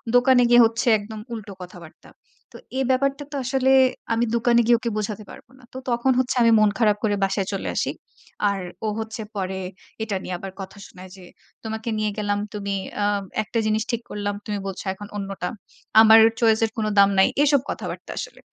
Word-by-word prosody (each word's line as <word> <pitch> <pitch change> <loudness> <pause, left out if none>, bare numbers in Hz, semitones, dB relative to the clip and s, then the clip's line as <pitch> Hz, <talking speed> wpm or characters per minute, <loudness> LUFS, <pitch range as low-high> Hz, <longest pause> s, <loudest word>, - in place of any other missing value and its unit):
দোকানে 250 0 +5
গিয়ে 240 0 +7
হচ্ছে 230 +2 -1
একদম 215 +1 -8
উল্টো 215 -3 -7
কথাবার্তা। 175 -2 -12 0.4
তো - - -9 0.2
এই - - +2
ব্যাপারটা 275 +2 0
তো - - -6
আসলে 265 +1 +1 0.4
আমি 230 +1 +1
দোকানে 235 0 +3
গিয়ে 240 0 +5
ওকে 235 -1 -2
বোঝাতে 215 0 -3
পারব - - -13
না। - - -20
তো - - -7
তখন 240 +2 +2
হচ্ছে 255 0 0
আমি 230 -1 +5
মন 215 -1 +5
খারাপ 210 -3 +3
করে 210 -2 +2
বাসায় 195 0 0
চলে 195 - -3
আসি। - - 0 0.6
আর 200 -1 -2 0.3
ও - - 0
হচ্ছে 225 0 -5
পরে 190 -1 -3 0.4
এটা 215 -2 -3
নিয়ে 185 - -4
আবার 195 +1 -7
কথা 190 +2 -9
শোনায় 185 +1 -13
যে, 185 - -13 0.4
তোমাকে 220 +1 -4
নিয়ে 215 0 0
গেলাম, 205 -1 -1
তুমি 200 -1 -3 0.3
আ - - +2 0.4
একটা 230 +2 -2
জিনিস 215 0 +1
ঠিক 235 -1 -2
করলাম, 205 0 -3
তুমি 210 -1 -3
বলছো 195 +1 -6
এখন 205 +2 -10
অন্যটা। 195 -2 -4 0.5
আমার 220 0 +8 0.2
choice 225 -1 +3
এর 220 - -5
কোন 220 - -1
দাম 200 0 +7
নাই। 190 - +6 0.2
এসব 285 -2 +3
কথাবার্তা - - -6
আসলে। - - -6
215 Hz, 195 wpm, -23 LUFS, 200-235 Hz, 0.6 s, আমার